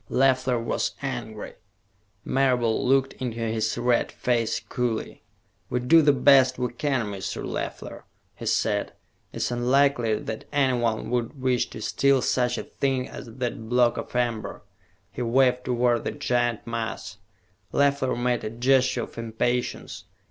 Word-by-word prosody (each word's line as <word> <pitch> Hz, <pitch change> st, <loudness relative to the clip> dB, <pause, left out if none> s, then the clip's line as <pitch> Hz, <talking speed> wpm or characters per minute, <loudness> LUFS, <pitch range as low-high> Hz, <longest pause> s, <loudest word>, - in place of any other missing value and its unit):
Leffler 130 Hz, -1 st, +2 dB
was 115 Hz, 0 st, -2 dB
angry. 120 Hz, -5 st, -5 dB, 0.7 s
Marable 125 Hz, -4 st, +1 dB
looked 135 Hz, 0 st, +3 dB
into 120 Hz, -3 st, -3 dB
his 110 Hz, -1 st, -1 dB
red 120 Hz, 0 st, +1 dB
face 120 Hz, -2 st, 0 dB
coolly. 120 Hz, -3 st, -3 dB, 0.5 s
"We 125 Hz, -, 0 dB
do 160 Hz, +7 st, +5 dB
the 145 Hz, -1 st, +5 dB
best 130 Hz, -1 st, +5 dB
we 125 Hz, -1 st, -2 dB
can, 135 Hz, -3 st, 0 dB
Mr. 100 Hz, -2 st, -5 dB
Leffler," -, -, -5 dB, 0.3 s
he -, -, -7 dB
said. -, -, 0 dB, 0.4 s
"It -, -, -9 dB
is -, -, -1 dB
unlikely 120 Hz, -1 st, +2 dB
that 110 Hz, +1 st, -5 dB
anyone 120 Hz, -6 st, +1 dB
would 125 Hz, +3 st, -2 dB
wish 130 Hz, -2 st, +1 dB
to 110 Hz, -, -8 dB
steal 140 Hz, -2 st, +2 dB
such 125 Hz, -1 st, +1 dB
a -, -, -3 dB
thing 135 Hz, -2 st, -1 dB
as -, -, -9 dB
that 115 Hz, -1 st, -5 dB
block 120 Hz, -1 st, +3 dB
of -, -, -6 dB
amber." 120 Hz, -3 st, -2 dB, 0.5 s
He -, -, -6 dB
waved 125 Hz, +1 st, +2 dB
toward 120 Hz, -1 st, +1 dB
the -, -, -1 dB
giant 120 Hz, -2 st, -1 dB
mass. 115 Hz, -1 st, -4 dB, 0.5 s
Leffler 140 Hz, -2 st, +2 dB
made 120 Hz, -1 st, 0 dB
a 110 Hz, -, -2 dB
gesture 125 Hz, +1 st, +2 dB
of -, -, -9 dB
impatience. 115 Hz, +2 st, -2 dB
125 Hz, 145 wpm, -25 LUFS, 115-130 Hz, 0.7 s, do